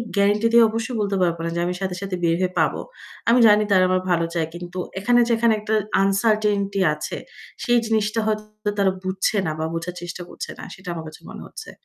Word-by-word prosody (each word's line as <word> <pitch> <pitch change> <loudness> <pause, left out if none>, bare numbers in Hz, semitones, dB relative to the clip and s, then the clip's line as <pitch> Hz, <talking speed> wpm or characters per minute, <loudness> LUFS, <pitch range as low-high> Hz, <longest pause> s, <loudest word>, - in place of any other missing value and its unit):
Guarantee 205 +3 +3
দিয়ে 235 - +8
অবশ্যই 225 +2 -3
বলতে 200 -1 0
পারব 170 -2 +2
না 170 - -1
যে 170 - -1
আমি 180 - -1
সাথে, 185 -2 -2
সাথে 195 -2 -3
বের 165 0 +3
হয়ে 185 -1 +1
পাব। - - +3 0.6
আমি 245 +2 +5
জানি 210 0 +5
তারা 185 -2 +5
আমার 185 0 +2
ভালো 170 -1 +2
চায় 165 -2 0
কিন্তু 175 +1 -8 0.2
এখানে 240 +5 +3
যেখানে 230 -1 +3
একটা 215 +1 -3 0.3
uncertainty 200 -1 +1
আছে 150 - -5 0.5
সেই 240 -1 +3
জিনিসটা 220 0 0
হয়তো 215 0 -3
তারা 195 -1 +4
বুঝছে 190 +3 0
না 155 - -1
বা 160 - -1
বোঝার 175 +2 -4
চেষ্টা 175 +1 -6
করছে - - -7
না - - -8
সেটা 185 -1 -15
আমার 165 -1 -6
কাছে 155 - -12
মনে - - -9
হচ্ছে। 445 - -10
200 Hz, 210 wpm, -22 LUFS, 180-215 Hz, 0.6 s, দিয়ে